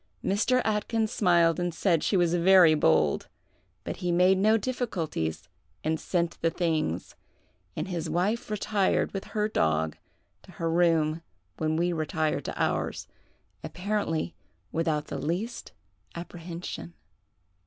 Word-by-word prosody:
Mr. 245 +6 +2
Atkyns 220 +1 0
smiled 170 -4 +3
and 175 -2 -2
said 170 -3 +2
she 200 - +2
was 175 -1 +2
very 175 -1 +6
bold; 80 - +2 0.6
but - - -5
he 175 -1 -1
made 180 +2 +4
no 215 +3 +4
difficulties, 170 - -3 0.4
and 160 0 0
sent 170 -2 -1
the 165 - +3
things,—and 155 - -4
his 170 -3 -3
wife 190 +9 0
retired 210 -1 +1
with 195 - -4
her 210 -1 -1
dog 80 - 0 0.5
to - - -16
her 165 0 -2
room 165 -2 +2 0.4
when 155 0 0
we 175 +2 +1
retired 155 -1 -1
to - - -5
ours, - - -1 0.6
apparently 180 -4 -2 0.4
without 160 -2 0
the - - -5
least 190 +10 -3 0.4
apprehension. 170 - -7
170 Hz, 125 wpm, -28 LUFS, 160-195 Hz, 0.6 s, very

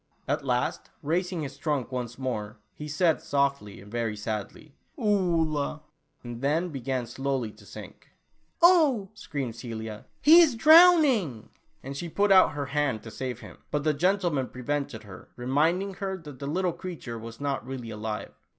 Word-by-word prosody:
At - - -1
last, - - -1
raising 175 +2 -1
his 140 -1 -7
trunk 145 -5 -1
once 125 -2 -4
more, 115 -4 -4 0.2
he 150 - -8
said 160 +2 +1
softly 140 -7 -1
and 100 +2 -14
very 115 -2 -2
sadly, 110 +7 -5 0.2
"Oolah," 170 - 0 0.4
and 120 -1 -7
then 160 +6 +1
began 130 -3 -3
slowly 130 -1 -2
to 105 -1 -18
sink! - - -11 0.5
"Oh," 295 - +5
screamed 140 - -5
Celia, 110 -3 -7
"he 320 +3 +8
is 300 -8 +4
drowning," 295 - +6 0.3
and 135 +1 -6
she 170 +5 -5
put 200 +4 +1
out 190 -1 +6
her 145 -1 -3
hand 140 -5 -1
to 110 - -9
save 125 0 -5
him, - - -12
but 150 -1 -1
the 155 0 +2
gentle 180 +4 +1
man 135 -4 -1
prevented 125 -3 -4
her, 100 -3 -12
reminding 160 +10 +1
her 190 0 -4
that 150 -6 -11
the 140 - -5
little 180 +3 0
creature 170 -10 -7
was 115 0 -9
not 140 -1 -2
really 125 -3 -6
alive. 105 0 -5
140 Hz, 165 wpm, -27 LUFS, 120-180 Hz, 0.5 s, he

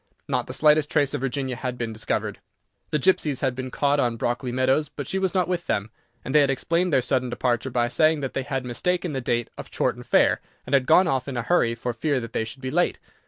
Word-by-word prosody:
Not - - -1
the - - -6
slightest 150 -1 +4
trace 140 -2 +2
of - - -2
Virginia 135 -1 -2
had 125 0 -4
been 115 -2 -3
discovered. 110 +1 -2 0.5
The - - +1
gipsies 150 -3 +2
had 130 -2 +1
been 130 +1 -5
caught 145 +2 +1
on 120 -4 +1
Brockley 120 +2 -2
meadows, 130 +4 +1
but 145 -2 -6
she 190 - -1
was 190 0 -1
not 180 -2 +2
with 180 -1 -2
them, 105 +1 -1 0.3
and 135 - -4
they 150 - +7
had 140 - +3
explained 170 +6 0
their 130 -4 +3
sudden 130 -1 0
departure 120 +1 -1
by 120 -1 +1
saying 155 +4 +3
that 135 - -4
they - - -1
had 135 -1 -3
mistaken 175 +7 -1
the 135 - -2
date 120 -1 -1
of - - -8
Chorton - - -1
Fair, - - +3 0.2
and - - -6
had 135 -2 +3
gone 185 0 +6
off 130 -4 0
in 135 -3 -4
a 120 - -1
hurry 120 -7 +2
for 120 +1 -3
fear 140 +4 0
they 115 -1 -3
should 130 +4 -9
be 130 - -3
late. 175 +2 +1
130 Hz, 245 wpm, -24 LUFS, 125-150 Hz, 0.5 s, they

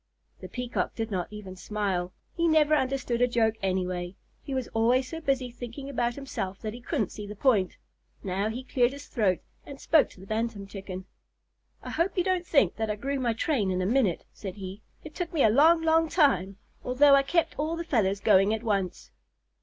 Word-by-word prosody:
The - - -9
Peacock 250 -1 -3
did 225 -1 -3
not 180 -3 -1
even 210 -3 -9
smile. 185 -2 -2 0.2
He 335 0 +1
never 310 -1 +4
understood 265 -4 0
a 245 - +5
joke 230 -2 +2
anyway. 185 -1 -2 0.3
He 275 - -5
was 260 -2 -2
always 245 +3 +2
so 325 +4 -6
busy 265 -4 0
thinking 245 +3 -7
about 240 -3 0
himself 200 -9 -5
that 215 -1 -3
he 245 - -9
couldn't 240 - -1
see 210 -1 -7
the 210 - -7
point. 205 -5 +2 0.5
Now 195 +2 -1
he 245 +4 -5
cleared 255 0 +1
his 285 +1 -9
throat 200 -8 0 0.2
and 280 -1 -10
spoke 315 -3 +4
to - - -17
the 190 - -11
Bantam 220 -1 -2
Chicken. 190 -2 -7 0.8
"I - - -6
hope 340 +5 0
you 360 - +3
don't 370 -1 0
think 225 - +3
that 220 -1 -1
I 210 - 0
grew 275 +5 -3
my 240 -3 +1
train 225 -4 0
in 185 0 0
a 185 - 0
minute," 215 -5 +1
said 190 -3 -7
he. 195 +1 -8 0.2
"It 310 - -10
took 355 -2 -4
me 310 - +3
a 220 - +5
long, 325 +7 +5
long 325 0 +3
time, 200 - +2 0.3
although 275 +3 +5
I 275 - +7
kept 330 +4 0
all 315 +3 0
the 335 - -4
feathers 205 - +1
going 200 +1 +4
at 220 - -7
once." 195 - -2
235 Hz, 210 wpm, -28 LUFS, 195-280 Hz, 0.8 s, I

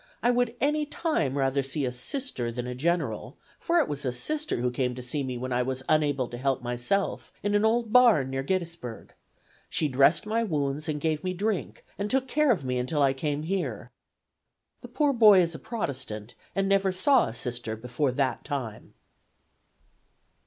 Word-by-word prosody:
I 245 - +4
would 245 -1 +1
any 300 +1 +1
time 220 - -1
rather 135 0 +1
see 135 +1 -2
a 125 - -1
Sister 125 - -3
than 120 +1 -4
a 125 - -4
general, 135 -4 -1 0.2
for 340 - +1
it 315 - +3
was 145 -1 -4
a 130 - 0
Sister 305 - -2
who 125 +1 0
came 125 0 -1
to 125 - -7
see 135 +4 -3
me 130 -2 -3
when 130 +1 -3
I 125 - +2
was 130 +1 -3
unable 145 -4 +2
to 120 - -7
help 135 -1 0
myself, 120 +11 -1
in 205 0 0
an 205 +1 +3
old 225 0 +1
barn 225 - +5
near 135 0 -1
Gettysburg. 170 -7 -4 0.6
She 155 - +1
dressed 140 - +4
my 220 +2 0
wounds 150 -5 -1
and 150 -1 -1
gave 155 0 -1
me 185 0 -2
drink, 205 0 -2
and 205 +1 -2
took 265 +2 +1
care 300 +1 +3
of 170 - 0
me 125 -1 -1
until 145 +4 0
I 135 -1 +4
came 145 +2 -2
here.' 145 - -3 0.9
The - - -9
poor 290 -2 +1
boy 215 -5 +7
is 170 -1 +2
a 155 - -7
Protestant, 130 - -4 0.2
and 195 0 +1
never 195 -1 +3
saw 240 +8 +3
a 110 - -6
Sister 120 -2 -3
before 125 +4 -1
that 130 0 -1
time. 130 -8 -5
145 Hz, 190 wpm, -27 LUFS, 125-205 Hz, 0.9 s, boy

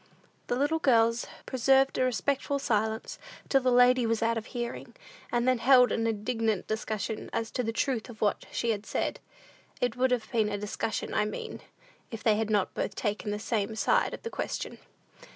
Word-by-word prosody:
The - - 0
little 290 +5 +1
girls 230 -5 +3 0.2
preserved 270 +1 +3
a - - +3
respectful 275 +3 0
silence, 220 -4 -1 0.3
till 270 - +4
the 255 0 +2
lady 250 0 +5
was 230 0 0
out 230 0 +2
of 225 -1 -4
hearing, 240 -2 -5 0.4
and 240 +1 +1
then 255 -2 +3
held 250 0 +6
an 225 0 0
indignant 225 -1 -1
discussion 215 -1 -3
as 225 -1 -2
to - - -1
the 225 -2 -1
truth 245 0 -1
of 225 -3 -11
what 205 - 0
she 235 - 0
had 210 -1 -4
said. - - -2 0.6
It 245 -2 0
would 260 +1 +2
have 245 -3 -1
been 220 -4 +2
a 205 - -2
discussion, 210 +2 -3
I - - +2
mean, 210 - -6 0.5
if 225 -3 -7
they 220 -2 +4
had 220 0 -1
not 205 -3 +1
both 200 - -3
taken 210 -1 -2
the 205 - -1
same 215 0 -2
side - - +2
of - - -15
the 460 - -5
question. - - -4
230 Hz, 190 wpm, -29 LUFS, 220-250 Hz, 0.6 s, held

